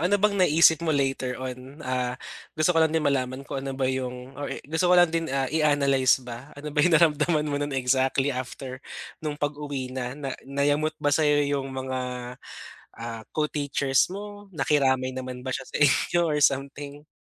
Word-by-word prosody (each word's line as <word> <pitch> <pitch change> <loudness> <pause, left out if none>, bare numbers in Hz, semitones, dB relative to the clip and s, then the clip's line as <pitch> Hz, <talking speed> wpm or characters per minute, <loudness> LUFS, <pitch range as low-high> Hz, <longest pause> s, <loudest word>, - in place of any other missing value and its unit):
Ano 180 +5 +3
bang 200 -1 +2
naisip 160 -2 +5
mo 170 - -3
later 135 -3 0
on, 130 +3 -8
ah, 125 -1 -1 0.4
gusto 155 +3 +3
ko 165 - +3
lang 160 0 +3
din 160 - 0
malaman 130 -1 0
kung 135 - -4
ano 135 0 -5
ba 135 - 0
yung 130 0 -3
or 145 - -3
i - - -4
gusto 160 +5 0
ko 180 - +6
lang 175 -2 +5
din, 165 -1 -1
ah, 135 0 0
i-analyze 140 -4 +3
ba. 120 +3 -8
Ano 145 +1 -7
ba 150 - +2
yung 165 +2 +5
naramdaman 155 -1 +3
mo 145 -1 -2
noon 145 -1 -2
exactly 130 +2 +1
after 130 0 -6 0.4
nung 150 -2 -3
pag-uwi 145 -3 -3
na, 130 0 -4
na 140 -3 -4 0.2
nayamot 145 +3 +1
ba 145 -1 0
sa'yo 150 -1 +3
yung 140 -1 -1
mga, 130 0 -3 1.0
ah, 115 -1 -6
co-teachers 140 -3 +1
mo? 205 +1 -8
Nakiramay 130 -6 +1
naman 130 0 -6
ba 130 - -1
siya 135 - -3
sa - - -3
inyo 145 +4 +3
or 150 -2 0
something? 140 +1 -1
140 Hz, 185 wpm, -26 LUFS, 130-155 Hz, 1.0 s, ko